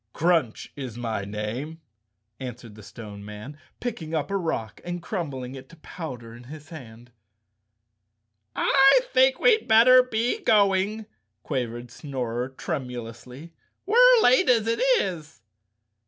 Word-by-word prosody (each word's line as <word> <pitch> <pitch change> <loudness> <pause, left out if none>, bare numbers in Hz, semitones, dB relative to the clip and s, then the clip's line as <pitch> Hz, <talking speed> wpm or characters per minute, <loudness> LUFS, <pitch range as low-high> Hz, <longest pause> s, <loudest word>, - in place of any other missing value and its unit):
"Crunch 165 -9 0
is 130 -5 -7
my 115 -4 -3
name," 110 +10 -5 0.6
answered 120 -3 -8
the 105 - -13
Stone 105 0 -11
Man, 105 +7 -9 0.2
picking 165 -10 -5
up 155 +3 -2
a - - -1
rock 160 - -3
and 175 0 -5
crumbling 140 - -5
it 130 -1 -11
to - - -15
powder 130 -8 -9
in 120 +1 -13
his 150 +3 -12
hand. 120 -6 -12 1.4
"I 275 - +5
think 260 +1 +4
we'd 450 -3 +3
better 245 +3 +7
be 245 - -1
going," 210 - +2 0.4
quavered 120 -3 -4
Snorer 125 -3 -4
tremulously. 125 +1 -7 0.3
"We're - - +6
late 255 +1 +4
as 230 -3 +3
it 230 0 -1 0.2
is." 160 -8 -5
145 Hz, 125 wpm, -25 LUFS, -, 1.4 s, better